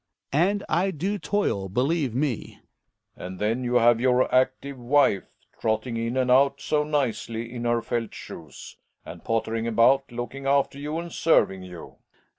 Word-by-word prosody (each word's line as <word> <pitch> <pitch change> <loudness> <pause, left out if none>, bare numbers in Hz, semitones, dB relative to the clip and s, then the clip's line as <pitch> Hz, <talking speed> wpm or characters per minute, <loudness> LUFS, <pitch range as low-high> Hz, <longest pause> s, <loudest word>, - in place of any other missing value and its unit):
And 195 +7 +2
I 180 +5 +1
do 190 +4 -2
toil, 165 - -1
believe 130 - 0
me. 135 -4 -2 0.6
Relling. - - -7
And 95 0 -8
then 110 +6 -1
you 125 0 -1
have 120 -1 +5
your 125 0 +2
active 130 +1 +1
wife, 125 -5 +2 0.2
trot 110 -1 0
ting 125 -3 -5
in 115 +2 -2
and 130 -1 +2
out 140 +2 +4
so 150 -1 0
nicely, 120 -5 -2
in 120 -1 -5
her 120 -1 +1
felt 115 -2 -2
shoes, 80 -5 -10 0.3
and - - -10
pottering 115 0 -1
about, 120 +4 +3
looking 120 +3 -5
after 140 0 +1
you 150 +2 -4
and 170 0 -6
serving 145 - +2
you. 90 -2 -11
125 Hz, 165 wpm, -25 LUFS, 115-145 Hz, 0.6 s, have